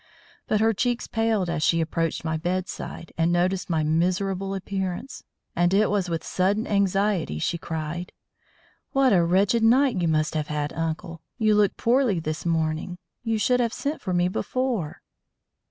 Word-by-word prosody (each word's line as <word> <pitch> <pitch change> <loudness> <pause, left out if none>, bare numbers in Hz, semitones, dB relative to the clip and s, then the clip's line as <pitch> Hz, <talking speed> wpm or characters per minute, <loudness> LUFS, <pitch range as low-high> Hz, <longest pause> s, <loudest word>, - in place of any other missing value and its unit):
But 215 - +1
her 225 0 +4
cheeks 245 +3 -1
paled 225 -4 0
as 170 -2 -2
she 165 +2 +3
approached 165 0 -1
my 160 0 0
bedside 175 0 -4
and 165 +1 +3
noticed 180 +2 0
my 160 -2 +1
miserable 185 +4 0
appearance; 190 +6 -4 0.3
and 175 +2 +3
it 210 0 +3
was 195 -3 0
with 165 -1 -2
sudden 200 +4 0
anxiety 200 - +1
she 170 - -1
cried: 160 +2 -4 0.8
"What 270 -4 +4
a 175 -3 +4
wretched 195 +6 +2
night 240 -2 +4
you 170 - +1
must 155 -1 +1
have 155 -2 -2
had, 150 -1 -2
uncle! 165 +1 -4 0.2
You 215 -2 +3
look 210 -1 +3
poorly 240 -6 +2
this 155 +1 -4
morning. 160 +2 -1 0.2
You 225 -2 -1
should 250 +3 +2
have 235 -2 +1
sent 290 +2 -3
for 185 - -3
me 175 0 +2
before." 230 - -2
185 Hz, 165 wpm, -25 LUFS, 165-215 Hz, 0.8 s, her